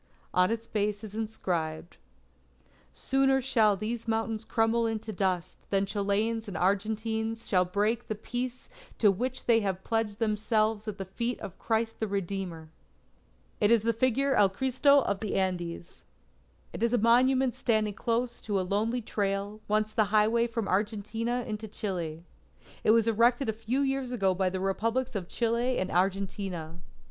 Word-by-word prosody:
On 180 Hz, 0 st, +4 dB
its 230 Hz, 0 st, -2 dB
base 210 Hz, -1 st, -1 dB
is 210 Hz, -2 st, -8 dB
inscribed: 175 Hz, -7 st, -3 dB, 0.9 s
_Sooner 270 Hz, -, +2 dB
shall 230 Hz, -6 st, +3 dB
these 225 Hz, +3 st, -4 dB
mountains 225 Hz, 0 st, -1 dB
crumble 225 Hz, +1 st, +1 dB
into 220 Hz, -1 st, -4 dB
dust, 185 Hz, -2 st, -1 dB
than 195 Hz, 0 st, +2 dB
Chileans 210 Hz, +3 st, -1 dB
and 190 Hz, -5 st, -5 dB
Argentines 220 Hz, +4 st, -1 dB
shall 180 Hz, -2 st, +3 dB
break 210 Hz, +6 st, 0 dB
the 215 Hz, -, -2 dB
peace 245 Hz, +3 st, -4 dB, 0.3 s
to 210 Hz, -3 st, +5 dB
which 250 Hz, +6 st, -3 dB
they 230 Hz, -1 st, +5 dB
have 190 Hz, -3 st, -2 dB
pledged 225 Hz, -2 st, -1 dB
themselves 215 Hz, 0 st, +1 dB
at 210 Hz, -2 st, -4 dB
the 195 Hz, -, -4 dB
feet 235 Hz, +6 st, -3 dB
of 185 Hz, -, -8 dB
Christ 225 Hz, 0 st, -1 dB
the 220 Hz, -, -1 dB
Redeemer._ 190 Hz, -4 st, -4 dB, 0.9 s
It 205 Hz, -, +3 dB
is 230 Hz, -2 st, +4 dB
the 230 Hz, 0 st, +2 dB
figure 260 Hz, +4 st, +1 dB
of -, -, +2 dB
El 200 Hz, -, +6 dB
Cristo 265 Hz, +6 st, +3 dB
of 200 Hz, -1 st, -1 dB
the 215 Hz, -2 st, -3 dB
Andes. 175 Hz, -2 st, -3 dB, 0.7 s
It -, -, -6 dB
is 235 Hz, +1 st, +2 dB
a -, -, +4 dB
monument 250 Hz, +3 st, +4 dB
standing 220 Hz, -5 st, +1 dB
close 235 Hz, +3 st, -1 dB
to 205 Hz, -3 st, -1 dB
a -, -, 0 dB
lonely 220 Hz, +5 st, 0 dB
trail, 200 Hz, 0 st, -2 dB
once 215 Hz, +1 st, +1 dB
the 215 Hz, -, +3 dB
highway 215 Hz, +3 st, +3 dB
from 230 Hz, -3 st, -3 dB
Argentina 220 Hz, +4 st, -1 dB
into 215 Hz, 0 st, -4 dB
Chile. 175 Hz, -7 st, -4 dB, 0.6 s
It -, -, +2 dB
was 225 Hz, 0 st, +5 dB
erected 235 Hz, +3 st, +3 dB
a -, -, +1 dB
few 225 Hz, +5 st, -1 dB
years 270 Hz, -2 st, 0 dB
ago 195 Hz, -7 st, +1 dB
by 185 Hz, 0 st, +1 dB
the 185 Hz, +1 st, -3 dB
Republics 230 Hz, +7 st, -1 dB
of 190 Hz, -5 st, -4 dB
Chile 235 Hz, +4 st, 0 dB
and 185 Hz, -, -1 dB
Argentina. 185 Hz, -3 st, -1 dB
215 Hz, 165 wpm, -29 LUFS, 195-230 Hz, 0.9 s, El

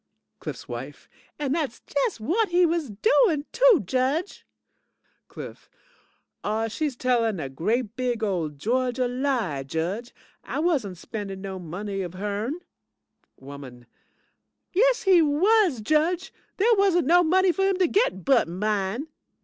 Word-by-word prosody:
CLIFF'S -, -, -7 dB
WIFE -, -, -8 dB, 0.3 s
And 285 Hz, -2 st, -1 dB
dat's 310 Hz, -4 st, -2 dB
just -, -, -1 dB
whut 360 Hz, -, 0 dB
he 350 Hz, +1 st, +4 dB
was 330 Hz, -4 st, -1 dB
doing, 310 Hz, -, +2 dB
too, -, -, +5 dB
Judge. 265 Hz, -, -1 dB, 0.8 s
CLIFF -, -, -10 dB, 0.7 s
AW, 220 Hz, +2 st, -1 dB
she's 280 Hz, +4 st, -2 dB
tellin' 235 Hz, -6 st, +1 dB
a 140 Hz, -4 st, -4 dB
great 215 Hz, -, -1 dB
big 245 Hz, -3 st, -2 dB
ole 180 Hz, -7 st, 0 dB
Georgia 245 Hz, -, -1 dB
lie, 245 Hz, -, -1 dB
Judge. 170 Hz, -, -3 dB, 0.3 s
I -, -, -5 dB
wasn't 285 Hz, -, 0 dB
spendin' 195 Hz, +1 st, -6 dB
no 190 Hz, -1 st, -6 dB
money 195 Hz, +4 st, -5 dB
of 180 Hz, -1 st, -6 dB
her'n. 210 Hz, -, -3 dB, 0.8 s
WOMAN 135 Hz, -3 st, -11 dB, 0.9 s
Yes 475 Hz, +4 st, +3 dB
he 375 Hz, -4 st, +6 dB
was, 330 Hz, -, +3 dB
Judge. 315 Hz, -, +1 dB, 0.2 s
There 455 Hz, +4 st, +4 dB
wasn't 390 Hz, -, +3 dB
no 350 Hz, +5 st, +5 dB
money 370 Hz, +3 st, +3 dB
for 385 Hz, +3 st, -1 dB
him 390 Hz, -1 st, +1 dB
to 370 Hz, -, +3 dB
git 345 Hz, -, +1 dB
but 270 Hz, -9 st, +4 dB
mine. 205 Hz, -, -2 dB
255 Hz, 135 wpm, -25 LUFS, -, 0.9 s, he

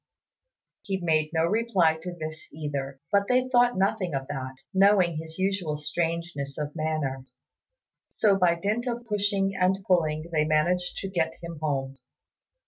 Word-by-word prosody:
He 195 Hz, -2 st, -3 dB
made 155 Hz, -3 st, +1 dB
no 165 Hz, -1 st, +2 dB
reply 190 Hz, -6 st, +2 dB
to 180 Hz, +1 st, -6 dB
this 155 Hz, -1 st, -7 dB
either; 140 Hz, -3 st, -4 dB
but 200 Hz, -1 st, +3 dB
they 255 Hz, 0 st, +3 dB
thought 245 Hz, -3 st, +3 dB
nothing 190 Hz, -4 st, +1 dB
of 135 Hz, 0 st, -3 dB
that, 130 Hz, -2 st, -4 dB, 0.2 s
knowing 190 Hz, -4 st, +4 dB
his 160 Hz, 0 st, -7 dB
usual 190 Hz, -5 st, 0 dB
strangeness 165 Hz, -2 st, -3 dB
of 150 Hz, 0 st, -4 dB
manner, 155 Hz, -4 st, -2 dB, 0.9 s
so 205 Hz, -2 st, +3 dB
by 180 Hz, -3 st, +3 dB
dint 210 Hz, +8 st, -1 dB
of 240 Hz, -1 st, -3 dB
pushing 200 Hz, -2 st, 0 dB
and 185 Hz, +1 st, +1 dB
pulling 160 Hz, -2 st, +1 dB
they 155 Hz, -2 st, +2 dB
managed 175 Hz, +4 st, +1 dB
to 195 Hz, -, -3 dB
get 165 Hz, -4 st, -1 dB
him 170 Hz, -2 st, -7 dB
home. 135 Hz, -3 st, -2 dB
170 Hz, 150 wpm, -27 LUFS, 155-195 Hz, 0.9 s, knowing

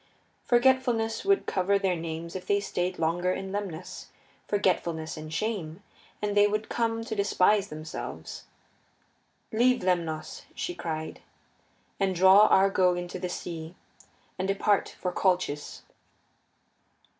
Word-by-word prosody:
Forgetfulness 240 Hz, -3 st, +2 dB
would 395 Hz, 0 st, +2 dB
cover 195 Hz, +1 st, +1 dB
their 190 Hz, -2 st, 0 dB
names 165 Hz, +1 st, -6 dB
if 185 Hz, -1 st, -6 dB
they 200 Hz, -, +3 dB
stayed 180 Hz, -2 st, -2 dB
longer 175 Hz, +3 st, 0 dB
in 190 Hz, 0 st, -5 dB
Lemnos 190 Hz, -4 st, -5 dB, 0.4 s
forgetfulness 170 Hz, -5 st, 0 dB
and 155 Hz, 0 st, -8 dB
shame, 185 Hz, -1 st, -3 dB, 0.4 s
and 205 Hz, 0 st, -1 dB
they 205 Hz, 0 st, +6 dB
would 215 Hz, +1 st, -2 dB
come 225 Hz, -1 st, -1 dB
to 225 Hz, -, -4 dB
despise 200 Hz, 0 st, +3 dB
themselves. 155 Hz, -1 st, -7 dB, 1.1 s
Leave 245 Hz, +1 st, +3 dB
Lemnos, 165 Hz, -4 st, -2 dB
she 355 Hz, -, -3 dB
cried, 160 Hz, -, -5 dB, 0.8 s
and 195 Hz, -2 st, +1 dB
draw 190 Hz, +4 st, +7 dB
Argo 190 Hz, -2 st, +4 dB
into 175 Hz, +1 st, -5 dB
the 180 Hz, -, -3 dB
sea, 165 Hz, -1 st, -6 dB, 0.6 s
and 190 Hz, -, -1 dB
depart 195 Hz, +1 st, +1 dB
for 180 Hz, -, -2 dB
Colchis. 180 Hz, -6 st, -1 dB
190 Hz, 120 wpm, -28 LUFS, 170-205 Hz, 1.1 s, draw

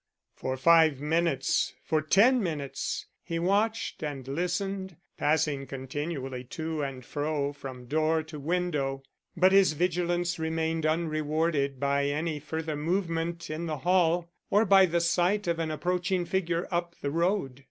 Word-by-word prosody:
For 130 Hz, 0 st, -3 dB
five 160 Hz, 0 st, +5 dB
minutes, 160 Hz, 0 st, +1 dB
for 155 Hz, -1 st, +1 dB
ten 225 Hz, -, +4 dB
minutes, 150 Hz, -7 st, -3 dB, 0.2 s
he 165 Hz, -, -4 dB
watched 205 Hz, +6 st, 0 dB
and 140 Hz, -4 st, -5 dB
listened, 180 Hz, +4 st, -2 dB, 0.2 s
passing 145 Hz, -2 st, +1 dB
continually 135 Hz, -1 st, -4 dB
to 160 Hz, +3 st, -4 dB
and 135 Hz, -3 st, -5 dB
fro 145 Hz, -1 st, -2 dB
from 130 Hz, -3 st, -9 dB
door 155 Hz, +4 st, +1 dB
to 155 Hz, -1 st, -9 dB
window. 145 Hz, -4 st, -1 dB, 0.3 s
But 185 Hz, +2 st, +5 dB
his 195 Hz, -4 st, +5 dB
vigilance 175 Hz, +1 st, 0 dB
remained 160 Hz, 0 st, -1 dB
unrewarded 155 Hz, -3 st, 0 dB
by 140 Hz, +1 st, +1 dB
any 155 Hz, +2 st, -1 dB
further 160 Hz, +1 st, -4 dB
movement 170 Hz, 0 st, -2 dB
in 165 Hz, +2 st, -3 dB
the 155 Hz, -1 st, -2 dB
hall, 170 Hz, +2 st, +2 dB, 0.2 s
or 210 Hz, +2 st, +4 dB
by 195 Hz, -1 st, +6 dB
the 170 Hz, 0 st, +1 dB
sight 180 Hz, +4 st, +2 dB
of 170 Hz, -1 st, 0 dB
an 160 Hz, -1 st, -1 dB
approaching 180 Hz, +3 st, -1 dB
figure 175 Hz, -2 st, -1 dB
up 170 Hz, 0 st, -1 dB
the 140 Hz, -, -2 dB
road. 170 Hz, -5 st, 0 dB
160 Hz, 140 wpm, -28 LUFS, 145-175 Hz, 0.3 s, by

